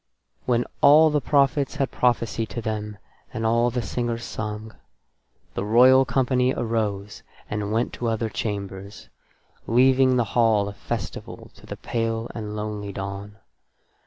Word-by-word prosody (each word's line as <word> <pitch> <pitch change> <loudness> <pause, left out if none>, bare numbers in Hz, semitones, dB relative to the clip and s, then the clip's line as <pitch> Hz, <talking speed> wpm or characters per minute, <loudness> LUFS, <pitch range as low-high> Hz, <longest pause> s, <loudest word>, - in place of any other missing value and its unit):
When 120 -1 +2 0.2
all 155 +2 +7
the 150 -1 +1
prophets 140 +2 +2
had 135 - -1
prophesied 115 -2 0
to 120 - -5
them 105 -1 -4 0.3
and 110 - -3
all 115 +2 +3
the 120 0 -2
singers 120 -1 -3
sung, 110 0 -6 0.8
that - - -3
royal 130 +5 +6
company 130 0 +1
arose 105 -3 -2 0.3
and 105 0 -2
went 115 +2 0
to 120 - 0
other 115 0 0
chambers, 100 -3 -5 0.6
leaving 130 +2 +4
the 120 - +3
hall 110 -4 +3
of 100 - -7
festival - - -6
to - - -17
the - - -7
pale 115 0 -2
and 105 -2 -6
lonely 105 -1 -4
dawn. 100 +2 -6
115 Hz, 140 wpm, -24 LUFS, 105-125 Hz, 0.8 s, all